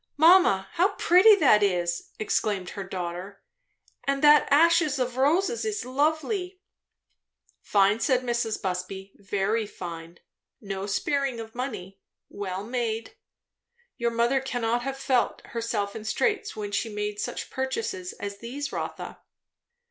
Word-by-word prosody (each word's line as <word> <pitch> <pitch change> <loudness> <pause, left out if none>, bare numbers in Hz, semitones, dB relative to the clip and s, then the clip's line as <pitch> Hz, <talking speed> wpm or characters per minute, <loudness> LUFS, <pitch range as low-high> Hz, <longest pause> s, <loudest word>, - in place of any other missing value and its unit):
"Mamma! 315 - +5
how 385 +4 +1
pretty 375 +5 +6
that 270 - +5
is!" 175 -3 0
exclaimed 205 -3 -1
her 200 - -5
daughter; 185 +1 -6 0.6
"and 275 0 -1
that 295 0 +7
ashes 320 0 +4
of 250 -1 -2
roses 340 - +2
is 425 -1 -3
lovely!" 315 - -1 1.0
"Fine," 200 +1 +3
said 255 +1 +2
Mrs. 235 -3 -1
Busby; 190 +1 -4
"very 205 +2 -1
fine. 170 -2 -8 0.4
No 195 -2 -5
sparing 270 +4 -1
of 225 0 -8
money. 210 -7 -6 0.3
Well 195 -1 -5
made. 235 - -3 0.8
Your 235 0 0
mother 235 +3 +2
cannot 240 -2 -1
have 270 +2 -4
felt 260 -2 0
herself 225 -3 -3
in 220 - -6
straits 420 - -1
when 205 -1 -5
she 225 +3 -1
made 210 0 -4
such - - -4
purchases 365 +8 -3
as 200 0 -7
these, 275 +4 -5
Rotha." - - -5
235 Hz, 130 wpm, -26 LUFS, 200-285 Hz, 1.0 s, that